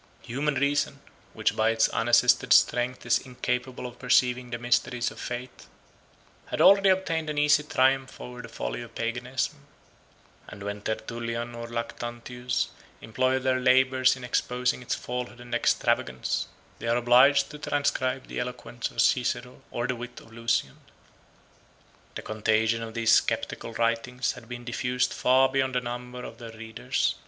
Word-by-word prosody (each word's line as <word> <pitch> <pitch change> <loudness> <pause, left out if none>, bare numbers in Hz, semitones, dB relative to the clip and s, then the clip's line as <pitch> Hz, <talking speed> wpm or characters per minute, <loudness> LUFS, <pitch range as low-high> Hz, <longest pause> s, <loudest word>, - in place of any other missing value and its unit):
Human 140 +4 -1
reason, 140 +1 0 0.3
which - - 0
by 110 +1 +3
its 115 0 +3
unassisted 120 +1 +4
strength 125 +1 +3
is - - +3
incapable 125 0 -3
of 125 - -8
perceiving 125 -1 +2
the 120 - -3
mysteries 120 0 0
of - - -12
faith, 125 +1 -6 0.8
had - - -4
already 195 0 +7
obtained 165 -4 +1
an 150 - -3
easy 150 0 +4
triumph 135 -2 +1
over 125 0 -8
the - - -10
folly - - -4
of 115 -1 -11
Paganism; 120 +4 -2 0.9
and 100 -1 -10
when 100 0 -5
Tertullian 115 +2 -4
or 115 0 -6
Lactantius 120 +1 -3 0.3
employ 130 +4 0
their 130 0 +1
labors 130 0 +4
in 130 - -11
exposing 125 +1 0
its 125 - -2
falsehood 125 0 -5
and 120 0 -10
extravagance, 65 - 0 0.3
they - - -5
are 115 +1 +2
obliged 135 +4 +5
to 150 - -9
transcribe 135 -3 -1
the - - -5
eloquence 125 -1 -4
of 115 - -1
Cicero 125 0 0
or 120 - -2
the 125 - -1
wit 120 +1 -8
of 110 - -17
Lucian. 115 - -1 1.4
The - - -6
contagion 110 +1 +1
of 115 0 -7
these 115 -1 +5
sceptical 115 - -4
writings 115 +2 0
had 120 -1 -12
been 120 0 -7
diffused 125 +1 -1
far 130 +1 +4
beyond 130 -1 0
the - - +3
number 125 +1 -6
of - - -9
their 115 -1 -9
readers. 110 0 -1
125 Hz, 155 wpm, -27 LUFS, 115-130 Hz, 1.4 s, already